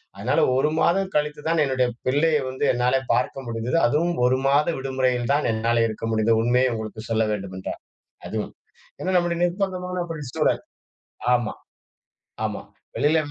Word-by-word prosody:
அதனால -, -, 0 dB, 0.2 s
1 135 Hz, +3 st, +2 dB
மாதம் 190 Hz, +3 st, +2 dB
கழித்து 150 Hz, 0 st, 0 dB
தான் 165 Hz, -, +2 dB
என்னுடைய 130 Hz, -2 st, +1 dB, 0.2 s
பிள்ளையை 150 Hz, +4 st, +3 dB
வந்து 130 Hz, -, -5 dB
என்னால 125 Hz, +1 st, +2 dB, 0.2 s
பார்க்க 125 Hz, +3 st, -1 dB
முடிந்தது. 115 Hz, +6 st, -1 dB
அதுவும் 170 Hz, +6 st, +1 dB
1 130 Hz, +1 st, +3 dB
மாத 140 Hz, +2 st, +4 dB
விடுமுறையில் 130 Hz, -2 st, 0 dB
தான் 145 Hz, +1 st, +1 dB
என்னால 115 Hz, +1 st, +1 dB
இருக்க 110 Hz, 0 st, -5 dB
முடிந்தது. 110 Hz, +1 st, +3 dB
உண்மையை 125 Hz, +2 st, +3 dB
உங்களுக்கு 110 Hz, 0 st, -6 dB
சொல்ல 110 Hz, 0 st, +2 dB
வேண்டுமென்றால் 95 Hz, -2 st, -5 dB, 0.5 s
அதுவும். -, -, -4 dB, 0.5 s
என்னன்னா 185 Hz, 0 st, -1 dB
நம்முடைய 175 Hz, -1 st, 0 dB
நிர்பந்தமான 180 Hz, 0 st, -2 dB
ஒரு 155 Hz, -, -7 dB
சூழல். -, -, +1 dB, 0.7 s
ஆமா, 120 Hz, -3 st, 0 dB, 0.9 s
ஆமா. -, -, -3 dB, 0.4 s
வெளியில 155 Hz, +2 st, +3 dB
130 Hz, 145 wpm, -24 LUFS, 115-160 Hz, 0.9 s, மாத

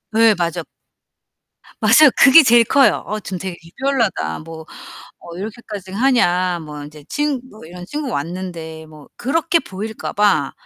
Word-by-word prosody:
예. 225 Hz, -2 st, +5 dB
맞어 170 Hz, -1 st, -2 dB, 1.2 s
맞아요. 305 Hz, -3 st, +6 dB
그게 280 Hz, +4 st, +8 dB
제일 240 Hz, -2 st, +5 dB
커요. 275 Hz, +4 st, +3 dB
'어 215 Hz, -, -4 dB
좀 190 Hz, -2 st, -6 dB
되게 185 Hz, -1 st, -6 dB
유별나다. 205 Hz, -, -2 dB
뭐 160 Hz, 0 st, -10 dB, 0.5 s
어 170 Hz, 0 st, -11 dB
이렇게까지 210 Hz, -1 st, -8 dB
하냐?' 185 Hz, -7 st, +1 dB
뭐 150 Hz, -1 st, -9 dB
인제 150 Hz, 0 st, -13 dB
친 295 Hz, -3 st, -1 dB
뭐 215 Hz, -, -14 dB
이런 175 Hz, +2 st, -10 dB
친구 295 Hz, +5 st, -5 dB
왔는데 160 Hz, 0 st, -6 dB
뭐 155 Hz, -2 st, -16 dB
그렇게 330 Hz, +6 st, 0 dB
보일까 215 Hz, -, -7 dB
봐 200 Hz, -9 st, +1 dB
190 Hz, 275 characters per minute, -18 LUFS, 165-240 Hz, 1.2 s, 그게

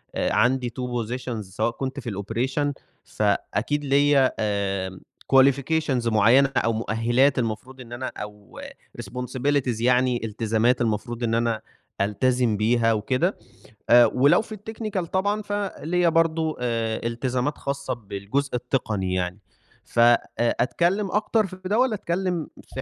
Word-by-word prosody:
عندي 125 Hz, +1 st, +1 dB
two -, -, -2 dB
positions، 120 Hz, 0 st, -3 dB
سواء 100 Hz, +4 st, -2 dB
كنت 135 Hz, +3 st, -5 dB
في 120 Hz, -3 st, -5 dB
الoperation 130 Hz, +8 st, -2 dB, 0.2 s
فأكيد 110 Hz, +7 st, -1 dB
ليّا 140 Hz, -1 st, +4 dB
آمم 100 Hz, -3 st, -2 dB, 0.4 s
qualifications 135 Hz, 0 st, +3 dB
مُعيّنة 120 Hz, +6 st, +5 dB
أو 115 Hz, -, +2 dB
مؤهلات 120 Hz, +5 st, +1 dB
المفروض 125 Hz, +3 st, -4 dB
إن 120 Hz, -1 st, -10 dB
أنا 125 Hz, +2 st, -4 dB
أو 105 Hz, -1 st, -9 dB, 0.4 s
responsibilities 125 Hz, -1 st, -2 dB
يعني 125 Hz, 0 st, +2 dB
التزامات 115 Hz, +3 st, +1 dB
المفروض 120 Hz, +2 st, -2 dB
إن 115 Hz, -1 st, +1 dB
أنا 115 Hz, -1 st, 0 dB, 0.4 s
ألتزم 120 Hz, +2 st, +1 dB
بيها 115 Hz, +1 st, +2 dB
وكده. 130 Hz, -, 0 dB, 0.8 s
ولو 140 Hz, -, +4 dB
في 220 Hz, 0 st, -8 dB
الtechnical 215 Hz, -2 st, -4 dB
طبعًا، 200 Hz, +5 st, 0 dB
فليّا 190 Hz, -4 st, -1 dB
برضه 165 Hz, -1 st, +1 dB
آآ، 115 Hz, -2 st, -1 dB
التزامات 125 Hz, +4 st, -2 dB
خاصة 140 Hz, -1 st, -3 dB
بالجزء 110 Hz, +5 st, -3 dB
التقَني 110 Hz, -7 st, -1 dB
يعني، 90 Hz, +1 st, -2 dB, 0.4 s
ف -, -, -4 dB, 0.4 s
أتكلم 175 Hz, -, +1 dB
أكتر 215 Hz, 0 st, +1 dB
في 185 Hz, 0 st, -12 dB
ده؟ 205 Hz, +5 st, +1 dB
والَّا 255 Hz, -3 st, +2 dB
أتكلم 180 Hz, -3 st, -2 dB, 0.3 s
في 130 Hz, -, -4 dB
125 Hz, 125 wpm, -24 LUFS, 115-145 Hz, 0.8 s, مُعيّنة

